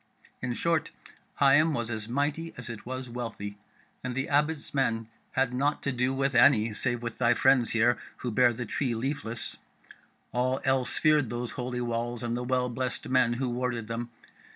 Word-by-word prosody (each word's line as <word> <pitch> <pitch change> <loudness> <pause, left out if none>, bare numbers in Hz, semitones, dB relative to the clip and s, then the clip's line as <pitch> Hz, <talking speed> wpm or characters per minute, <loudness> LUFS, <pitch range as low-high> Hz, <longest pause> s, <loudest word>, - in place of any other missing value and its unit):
In 125 -1 -2
short, 165 +1 +1 0.5
Higham 145 +3 +5
was 120 -2 -2
as 110 0 -4
mighty 145 +5 -1
as 125 -1 -8
it 115 0 -9
was 130 0 -4
wealthy; 115 -4 -6 0.4
and 125 -1 -3
the 135 +1 -2
Abbot's 150 +1 +1
men 115 -5 0 0.3
had 130 -1 +1
naught 145 +4 0
to 140 - 0
do 125 +1 +1
with 135 +1 0
any, 115 -4 +5
save 120 +3 0
with 115 -1 -5
thy 120 -1 +4
friends 130 -2 +4
here 120 +2 +3 0.2
who 125 - -3
bear 120 +2 +5
the 120 +1 -4
Tree 120 +2 -1
Leafless; 115 -2 -4 0.7
all 130 +2 +1
else 130 -1 +2
feared 150 -5 +4
those 120 0 -3
holy 125 0 -3
walls 120 0 -2
and 120 0 -1
the 125 - -2
well 125 0 +1
blessed 125 +1 -3
men 130 -2 +4
who 125 +1 -1
warded 120 -2 -2
them. 115 +1 -4
125 Hz, 180 wpm, -28 LUFS, 120-135 Hz, 0.7 s, Higham